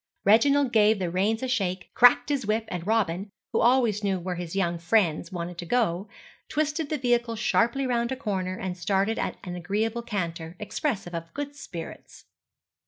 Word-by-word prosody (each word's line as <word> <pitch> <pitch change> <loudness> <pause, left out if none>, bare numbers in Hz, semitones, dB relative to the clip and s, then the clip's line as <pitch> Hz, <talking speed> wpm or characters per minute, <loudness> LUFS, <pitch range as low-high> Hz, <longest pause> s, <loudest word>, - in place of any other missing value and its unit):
Reginald 265 +6 +5
gave 215 -1 +5
the 180 -3 -2
reins 210 +6 0
a - - 0
shake, 190 -7 -1
cracked 245 +1 +6
his 280 -3 0
whip, 220 +1 +1
and 175 0 -5
Robin, 200 -3 0 0.2
who - - +2
always 235 -4 +3
knew 195 -2 0
where 180 +1 -3
his 175 0 -6
young 175 -3 0
friends 175 -2 +1
wanted 175 -1 -5
to 175 - -5
go, 205 -5 0 0.4
twisted 305 0 -1
the 305 - 0
vehicle 240 -2 +1
sharply 235 +4 +1
round 235 -1 0
a - - 0
corner 190 -7 -3
and 185 -1 -4
started 195 +4 0
at - - -2
an 180 -2 -5
agreeable 210 +6 -1
canter, 170 -7 -4
expressive 210 - -3
of 165 0 -5
good 285 0 -4
spirits. 175 - -9
210 Hz, 175 wpm, -26 LUFS, 180-240 Hz, 0.4 s, cracked